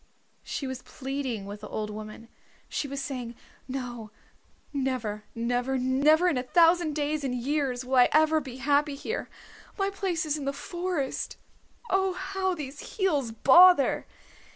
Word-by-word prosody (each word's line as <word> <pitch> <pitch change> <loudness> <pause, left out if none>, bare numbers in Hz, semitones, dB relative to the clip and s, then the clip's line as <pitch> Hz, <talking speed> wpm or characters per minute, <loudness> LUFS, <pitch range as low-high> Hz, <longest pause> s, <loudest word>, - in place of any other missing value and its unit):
She 275 - -4
was 260 -1 -5
pleading 265 -7 -4
with 205 +1 -8
the - - -7
old 210 -1 -3
woman. 215 +2 -8 0.4
She 285 - -3
was 280 0 -4
saying, 250 -4 -5 0.3
"No, 245 -4 -5 0.6
never, 250 -6 -2
never, 245 +3 0
never, 280 +7 +3
in 305 -8 +2
a - - 0
thousand 330 +3 +4
days 300 0 -1
and 255 -2 -1
years 260 -1 -1
will 260 +1 0
I 245 - +7
ever 315 0 +4
be 260 -3 -8
happy 285 +2 +2
here. 440 - -4 0.5
My 395 -1 0
place 370 -5 -2
is 305 0 0
in 280 - -5
the 275 - -1
forest. 345 -1 -3 0.5
Oh, 385 0 +2
how 380 0 -2
these 285 - -8
heels 300 - +1
bother!" 340 +7 +6
275 Hz, 155 wpm, -28 LUFS, 250-315 Hz, 0.6 s, I